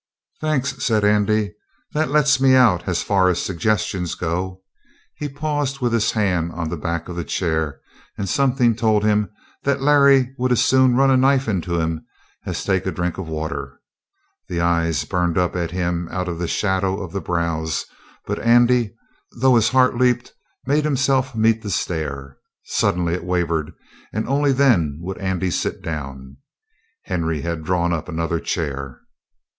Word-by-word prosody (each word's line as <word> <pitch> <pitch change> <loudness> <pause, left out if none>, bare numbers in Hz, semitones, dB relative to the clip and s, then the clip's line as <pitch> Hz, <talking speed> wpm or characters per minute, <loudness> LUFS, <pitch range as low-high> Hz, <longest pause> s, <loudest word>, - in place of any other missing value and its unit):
"Thanks," 140 -4 -1
said 110 -4 +2
Andy. 105 0 +2 0.4
"That 155 +1 0
lets 140 -2 +3
me 130 -1 +6
out 115 -9 +4
as 90 -2 0
far 95 -2 +3
as 90 - 0
suggestions 95 -1 -1
go." 90 +2 -3 0.5
He 150 - -5
paused 145 -1 -2
with 120 -3 0
his 115 -2 +2
hand 90 -6 0
on 85 -2 -3
the 85 - -3
back 85 +1 -3
of 90 - -6
the 85 - -3
chair, 80 -6 -2 0.4
and 100 - -3
something 125 0 +2
told 110 -2 +2
him 105 -1 +2 0.3
that 140 0 0
Larry 140 -3 +5
would 130 0 +1
as 125 - +3
soon 130 -1 +4
run 135 +1 +4
a 130 - +5
knife 135 0 +3
into 90 -4 -1
him 80 -1 -2 0.4
as - - -3
take - - 0
a - - 0
drink 90 +1 -3
of 95 - -5
water. 75 -3 -5 0.7
The 85 - -3
eyes 85 -3 +1
burned 90 -1 0
up 90 0 +1
at 85 -2 -1
him 85 -1 -2
out 90 0 -3
of 85 -2 -4
the 85 - -2
shadow 95 0 0
of 95 -5 -6
the 100 - -3
brows, 85 -2 -2 0.4
but - - -3
Andy, 120 -2 +3 0.4
though 130 +1 +5
his 115 -2 +4
heart 130 -2 +3
leaped, 125 -1 +1 0.3
made 150 +2 +2
himself 135 -3 +1
meet 115 0 +2
the 105 - -6
stare. 70 -7 -3 0.2
Suddenly 85 -1 0
it 90 - -3
wavered, 85 -3 -1 0.4
and 110 +1 -3
only 140 +2 +2
then 115 - +3
would 95 +2 -6
Andy 95 -2 -1
sit - - -2
down. 65 -4 -6 0.7
Henry 80 -4 -2
had 85 0 -4
drawn 85 +1 0
up 80 -2 -4
another 85 +1 -1
chair. 70 -7 -4
95 Hz, 170 wpm, -21 LUFS, 85-125 Hz, 0.7 s, me